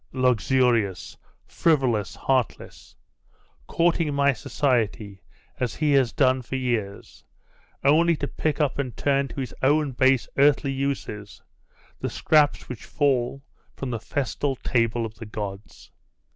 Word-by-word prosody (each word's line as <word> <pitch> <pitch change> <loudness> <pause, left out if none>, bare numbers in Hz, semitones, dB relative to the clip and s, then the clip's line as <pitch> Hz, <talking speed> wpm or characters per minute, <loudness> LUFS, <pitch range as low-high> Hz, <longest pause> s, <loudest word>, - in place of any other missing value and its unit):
Luxurious, 125 -5 +1 0.3
frivolous, 130 - +1
heartless 130 -5 -2 0.7
courting 165 -2 +1
my 140 0 +3
society, 110 -6 -1 0.4
as 125 -3 -2
he 155 -2 +1
has 135 -4 +3
done 130 -2 +2
for 125 +2 -6
years, 115 -6 -3 0.6
only 165 +4 +4
to 145 - -3
pick 155 +1 -2
up 145 -2 0
and 130 -4 -3
turn 140 -1 +1
to 140 - -8
his 130 - -4
own 145 +1 +2
base 130 0 +2
earthly 140 -1 +4
uses 135 -7 -4 0.6
the - - -3
scraps 150 -2 +2
which 125 -4 -8
fall 135 -2 0 0.3
from 135 -2 -5
the 115 - -3
festal 140 +2 -2
table 115 -2 0
of 110 - -7
the 110 +1 -10
gods! 100 -1 -8
130 Hz, 130 wpm, -24 LUFS, 115-140 Hz, 0.7 s, only